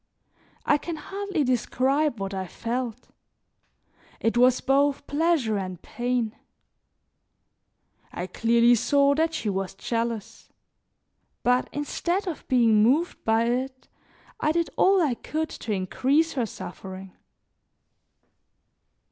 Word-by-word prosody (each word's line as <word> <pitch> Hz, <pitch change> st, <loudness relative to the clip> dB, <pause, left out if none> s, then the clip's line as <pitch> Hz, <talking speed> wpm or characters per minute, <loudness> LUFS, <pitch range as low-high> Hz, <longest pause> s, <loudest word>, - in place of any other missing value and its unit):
I 295 Hz, -, +3 dB
can 335 Hz, +2 st, -5 dB
hardly 390 Hz, +1 st, -3 dB
describe 260 Hz, +2 st, +1 dB
what 195 Hz, 0 st, -4 dB
I 190 Hz, -1 st, -3 dB
felt; 240 Hz, +3 st, -4 dB, 1.1 s
it 225 Hz, -, 0 dB
was 250 Hz, +1 st, +5 dB
both 280 Hz, +1 st, +2 dB
pleasure 290 Hz, -9 st, +1 dB
and 185 Hz, -2 st, -5 dB
pain. 240 Hz, 0 st, -2 dB, 1.8 s
I 175 Hz, -, -4 dB
clearly 235 Hz, +5 st, +3 dB
saw 280 Hz, +4 st, +3 dB
that 320 Hz, +2 st, 0 dB
she 230 Hz, -, -3 dB
was 195 Hz, -2 st, -2 dB
jealous; 230 Hz, 0 st, -4 dB, 0.9 s
but 250 Hz, +1 st, +2 dB
instead 345 Hz, +6 st, -2 dB
of 350 Hz, -5 st, -6 dB
being 230 Hz, -5 st, +4 dB
moved 285 Hz, +11 st, +2 dB
by 225 Hz, +1 st, +3 dB
it, 260 Hz, +2 st, -2 dB, 0.5 s
I 305 Hz, -, +2 dB
did 335 Hz, +1 st, 0 dB
all 380 Hz, -1 st, +4 dB
I 285 Hz, -5 st, +1 dB
could 315 Hz, +6 st, -3 dB
to 220 Hz, -, -6 dB
increase 265 Hz, -, +1 dB
her 245 Hz, -5 st, -1 dB
suffering. 190 Hz, 0 st, -9 dB
250 Hz, 115 wpm, -25 LUFS, 225-300 Hz, 1.8 s, was